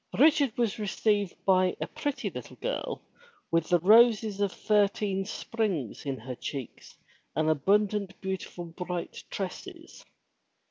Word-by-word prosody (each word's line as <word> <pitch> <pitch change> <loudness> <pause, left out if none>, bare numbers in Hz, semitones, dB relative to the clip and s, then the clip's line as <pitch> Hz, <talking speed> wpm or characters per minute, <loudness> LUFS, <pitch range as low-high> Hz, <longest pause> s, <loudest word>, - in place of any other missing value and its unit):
Richard 285 -4 +4
was 230 -3 0
received 205 -2 0
by 185 -1 +3
a - - -1
pretty 290 -1 -3
little - - -8
girl - - -4 0.5
with 165 -1 +1
the 175 - +5
roses 215 +2 +5
of 200 -2 +2
thirteen 205 -2 +1
springs 190 - -3
in 135 -1 -2
her 125 +3 -6
cheeks 130 +1 -7 0.4
and 155 0 +1
abundant 200 +5 +1
beautiful 190 -2 -5
bright 175 +1 -5
tresses. 335 - -7
200 Hz, 125 wpm, -29 LUFS, 175-220 Hz, 0.5 s, the